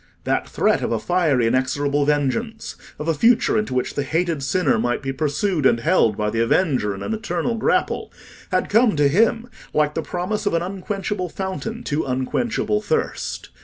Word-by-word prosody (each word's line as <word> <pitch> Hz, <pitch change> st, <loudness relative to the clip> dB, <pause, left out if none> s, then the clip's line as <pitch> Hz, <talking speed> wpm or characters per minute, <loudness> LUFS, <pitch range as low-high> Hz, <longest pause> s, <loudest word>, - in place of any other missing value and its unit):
That -, -, -1 dB
threat -, -, +1 dB
of -, -, -2 dB
a 115 Hz, -, +1 dB
fiery 150 Hz, -2 st, +1 dB
inexorable 140 Hz, +4 st, +1 dB
vengeance—of 150 Hz, -, -2 dB
a 165 Hz, -, +3 dB
future 230 Hz, +10 st, +3 dB
into 215 Hz, -12 st, -1 dB
which 125 Hz, -, -1 dB
the -, -, -1 dB
hated 165 Hz, +1 st, -1 dB
sinner 140 Hz, -3 st, +1 dB
might 120 Hz, +3 st, -1 dB
be 135 Hz, 0 st, -2 dB
pursued 155 Hz, +4 st, -1 dB
and 120 Hz, -3 st, +4 dB
held 115 Hz, -, +2 dB
by 105 Hz, 0 st, -1 dB
the 115 Hz, -, -1 dB
avenger 115 Hz, -, +1 dB
in 95 Hz, -, -7 dB
an -, -, -2 dB
eternal 225 Hz, +2 st, -2 dB
grapple, 230 Hz, +10 st, 0 dB, 0.4 s
had -, -, +1 dB
come 225 Hz, -2 st, +3 dB
to 145 Hz, -1 st, +4 dB
him 225 Hz, +9 st, +2 dB, 0.3 s
like 150 Hz, -1 st, +2 dB
the 165 Hz, -, -2 dB
promise 205 Hz, +6 st, -3 dB
of 185 Hz, -, +1 dB
an 165 Hz, -, +1 dB
unquenchable 195 Hz, 0 st, -3 dB
fountain 200 Hz, +6 st, -5 dB
to 150 Hz, +1 st, -1 dB
unquenchable 175 Hz, -, -1 dB
thirst. 460 Hz, -, -2 dB
165 Hz, 175 wpm, -22 LUFS, 135-210 Hz, 0.4 s, and